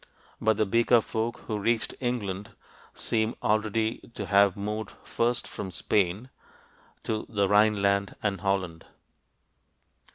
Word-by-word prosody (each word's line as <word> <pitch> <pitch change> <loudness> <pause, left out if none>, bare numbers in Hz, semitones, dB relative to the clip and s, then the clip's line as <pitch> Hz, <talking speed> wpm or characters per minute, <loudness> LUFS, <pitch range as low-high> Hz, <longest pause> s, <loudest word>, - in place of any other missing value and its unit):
But 110 -1 +3
the 110 - +2
Beaker 115 +3 +4
folk 115 +1 -3
who 110 -2 -2
reached 115 +2 +1
England 105 -6 -3 0.4
seem 110 0 0
already 110 +1 +1 0.2
to 105 - -4
have 100 -1 +4
moved 105 +2 -4
first 120 +1 -1
from 95 - -6
Spain(?) 100 +6 0 0.7
to 110 -1 -2
the 100 -2 +1
Rhineland 100 -1 +3
and 100 -2 -1
Holland. 95 -5 -1
105 Hz, 120 wpm, -27 LUFS, 100-110 Hz, 0.7 s, Beaker